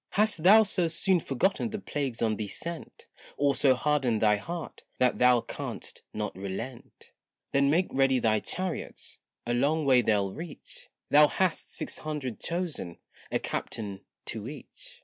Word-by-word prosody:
Hast 210 -5 +2
thou 210 +6 +8
so 185 -4 0
soon 175 +3 +3
forgotten 185 - 0
the 215 - -4
plagues 140 - -3
on 110 -1 +2
thee 105 - -3
sent, 170 - -6 0.3
Or 145 -1 +3
so 135 -1 +4
hardened 130 -4 +1
thy 105 -1 +4
heart 170 +10 -6 0.2
that 125 -1 +2
thou 125 -1 +5
can'st - - -6
not 105 -3 -4
relent? 100 +6 -7 0.4
Then 140 0 +3
make 170 +5 +3
ready 135 -1 +3
thy 110 -3 +2
chariots, 185 - -4 0.3
a 120 - 0
long 150 +5 +1
way 130 -2 +6
they'll 100 -4 +1
reach; 165 -1 -10 0.2
Thou 150 +1 +8
hast 185 +2 0
six - - -4
hundred 145 -7 -4
chosen, 165 - -4 0.3
a - - +2
captain 100 -3 -4 0.2
to 110 +2 -5
each. 485 - -12
140 Hz, 155 wpm, -28 LUFS, 115-170 Hz, 0.4 s, thou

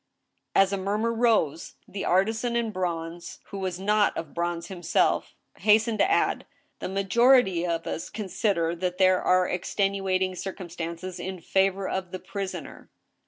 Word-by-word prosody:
" - - -49
As 195 0 +4
a 200 - -1
mumvur 210 +4 0
rose, 220 -10 +1
the 200 - -5
artisan 220 +6 +1
in 235 -2 0
bronze, 170 -3 -4
who 200 - -5
was 185 -2 -3
not 210 +1 +2
of 160 -3 -6
bronze 170 0 -2
himself, 175 -2 0 0.2
hastened 220 +1 +3
to - - +4
add; 400 - +1
" - - -44
The - - -4
majority 195 -1 +3
of 165 -1 -2
us 165 - -4
consider 195 -5 -1
that 180 0 -2
there 185 -1 +4
are 185 0 +3
extenuating 190 0 0
circum 185 -1 -6
stances 170 +2 -5
in 190 0 -5
favor 190 +2 +1
of 190 -1 -3
the 185 - -5
prisoner." 195 0 -6
190 Hz, 160 wpm, -26 LUFS, 175-205 Hz, 0.2 s, As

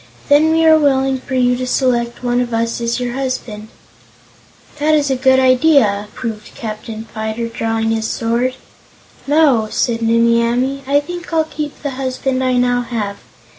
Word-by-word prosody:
Then 300 +2 +5
we 325 0 +3
are 315 0 +6
willing 270 -2 +1
for 260 +1 -6
you 250 -1 +3
to 255 0 -3
select 245 -2 0
one 245 0 +1
of 240 -2 -2
us 230 +1 -1
as 235 +1 -1
your 245 -1 -3
husband." 250 -5 -4 1.1
"That 310 +1 +3
is 290 -2 +1
a - - +2
good 260 0 +3
idea," 255 -6 +3
approved 215 -2 -7
Captain 220 -2 -6
Fyter, 220 +1 -3
drawing 225 -1 -1
his 220 0 -1
sword. 240 +3 -1 0.7
"No," 280 -7 +3
said 230 0 -1
Nimmie 230 +1 +3
Amee; 250 +4 0
"I 285 +1 +3
think 350 +3 -8
I'll 325 -1 +2
keep 305 -2 -7
the 285 - -2
husband 260 0 -2
I 255 0 +1
now 245 0 +2
have. 215 -4 -4
250 Hz, 170 wpm, -17 LUFS, 230-275 Hz, 1.1 s, are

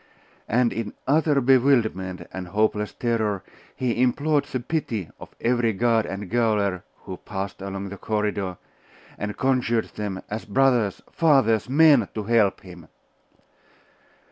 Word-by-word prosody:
And 120 +1 +2
in 115 -2 -5
utter 150 0 +3
bewilderment 120 -8 +2
and 95 -1 -6
hopeless 105 +2 0
terror 110 -5 -1 0.3
he 125 -2 -1
implored 145 +3 +2
the 130 - -4
pity 120 - -3
of - - -12
every 120 -1 +1
guard 115 +1 +1
and 100 +1 -5
gaoler 105 -5 +1 0.2
who 95 -2 -7
passed 100 0 -6
along 100 0 -5
the 100 - -8
corridor, 105 -4 -2 0.6
and 105 0 -4
conjured 125 -3 +1
them, 100 -3 -5
as 110 +1 -5
brothers, 120 -3 +2
fathers, 130 - +3
men, 145 -6 +5
to 110 - -3
help 110 -2 +2
him. 90 -3 -13
110 Hz, 130 wpm, -24 LUFS, 100-125 Hz, 0.6 s, men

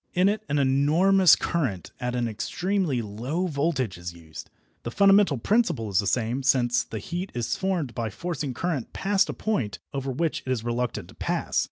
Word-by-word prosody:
In 185 +2 +4
it 215 +1 -1
an 145 - +1
enormous 155 +7 +5
current 125 - -2
at 125 -1 -2
an 120 -1 0
extremely 165 - -1
low 125 - -3
voltage 140 - -1
is 85 0 -6
used. 80 -2 -11 0.3
The - - -5
fundamental 195 0 +4
principle 165 - +1
is 95 - +3
the 100 - 0
same, 120 +4 0
since 125 -3 +2
the 110 - -7
heat 175 - -5
is 120 -2 -1
formed 180 -10 -1
by 115 -2 -2
forcing 150 - -4
current 155 -4 -3
past 195 0 +1
a - - -2
point 130 - -2 0.2
over 135 -1 -2
which 160 +4 -1
it 130 - -3
is 120 -4 -1
reluctant 120 0 -2
to - - -13
pass. - - -1
135 Hz, 185 wpm, -26 LUFS, 115-175 Hz, 0.3 s, enormous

